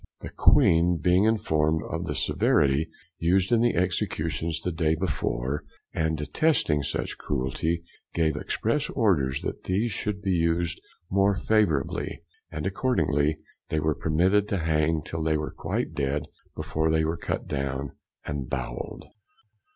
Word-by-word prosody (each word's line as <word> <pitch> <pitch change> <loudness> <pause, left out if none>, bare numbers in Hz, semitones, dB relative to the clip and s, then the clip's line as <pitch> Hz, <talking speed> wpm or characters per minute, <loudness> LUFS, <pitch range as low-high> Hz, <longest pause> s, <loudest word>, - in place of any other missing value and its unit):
The - - -7
Queen 85 +1 +4
being 90 +5 +3
informed 80 -8 +2
of - - -3
the - - -2
severity 75 +3 +2 0.3
used 90 +4 +2
in 115 -1 +4
the 120 0 +2
executions 85 -2 -1
the 90 - -2
day 80 -1 +1
before, 75 -4 -2 0.3
and 80 -1 0
detesting 75 - +1
such 70 - -3
cruelty, 75 +5 -1 0.3
gave 80 -2 +2
express 115 - -1
orders 70 - +1
that - - -5
these 105 +6 0
should 100 0 -3
be 95 - +1
used 85 0 +1 0.3
more 100 +1 +3
favourably; 110 +2 0 0.3
and - - -5
accordingly 75 - +1 0.3
they 80 - 0
were 75 0 +1
permitted 90 +8 +2
to 100 - -1
hang 80 -1 +1
till 80 - -4
they 80 -1 +1
were 75 - -4
quite - - -2
dead 70 -1 -1 0.3
before 80 0 -1
they 80 0 +2
were 80 +2 0
cut 85 - -3
down 70 -1 -3 0.3
and 70 -4 -4
bowell'd. - - -4
80 Hz, 145 wpm, -26 LUFS, 75-95 Hz, 0.3 s, Queen